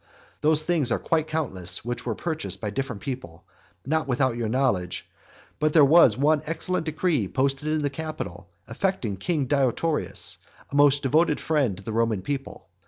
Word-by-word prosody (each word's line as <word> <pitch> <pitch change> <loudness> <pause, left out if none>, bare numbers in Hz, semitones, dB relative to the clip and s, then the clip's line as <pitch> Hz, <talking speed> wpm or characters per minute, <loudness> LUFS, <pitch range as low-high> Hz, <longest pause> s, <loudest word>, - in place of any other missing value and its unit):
Those 155 0 +4
things 155 -8 +1
are - - +2
quite 160 -1 0
countless 115 - -3
which 120 0 -4
were 115 - -1
purchased 160 -7 -4
of 105 -1 -3
different 130 -5 -4
people, 125 - -6 0.4
not 155 +3 0
without 130 -1 +1
your 115 -2 -2
knowledge; 110 -8 0 0.5
but 155 0 +1
there 155 -4 +7
was 140 -7 +6
one 150 +2 +3
excellent 165 +1 -2
decree 155 - 0
posted 135 +5 -1
up 155 - +1
in 155 - -1
the 145 - +1
Capitol 135 - -6 0.2
affecting 185 - -2
king 150 - -1
Deiotarus, 145 +3 +1 0.3
a - - -5
most 145 0 +5
devoted 150 +3 +2
friend 140 - 0
to 100 - -11
the 110 - -5
Roman 115 -4 0
people. 140 -1 -5
140 Hz, 170 wpm, -25 LUFS, 120-155 Hz, 0.5 s, there